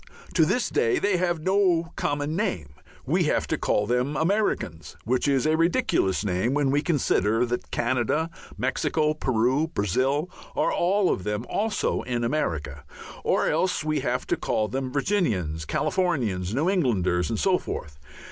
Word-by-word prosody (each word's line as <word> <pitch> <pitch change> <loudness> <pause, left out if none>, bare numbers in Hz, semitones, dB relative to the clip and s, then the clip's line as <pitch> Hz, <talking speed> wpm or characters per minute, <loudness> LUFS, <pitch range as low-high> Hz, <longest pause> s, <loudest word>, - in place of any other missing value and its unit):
To - - +4
this - - 0
day 445 -3 +2
they 205 - +1
have 175 -2 0
no 180 -3 +2
common 145 +2 -1
name. 85 - -2 0.3
We - - +2
have - - +1
to - - -1
call 105 - +1
them 125 +6 0
Americans, 115 - -1
which 125 +5 0
is 135 -1 +2
a 155 +1 +3
ridiculous 165 - +1
name 100 +7 0
when 145 -2 +2
we 145 +1 +2
consider 120 - +1
that 120 0 -4
Canada, 130 +7 0 0.3
Mexico, 155 -1 0
Peru, 130 +1 +1
Brazil 135 - 0 0.3
are - - +1
all 190 +2 +2
of 95 - -5
them 105 +3 -2
also 215 +1 -1
in 120 -2 -2
America. 80 - -2 0.4
Or - - +2
else 185 -4 +1
we 155 0 0
have - - -1
to - - 0
call 110 - 0
them 130 +2 -3
Virginians, 110 - 0
Californians, 130 - 0
New 150 +6 +1
Englanders, 95 - +1
and - - -1
so - - +2
forth. 75 -1 -6
135 Hz, 155 wpm, -25 LUFS, 105-170 Hz, 0.4 s, To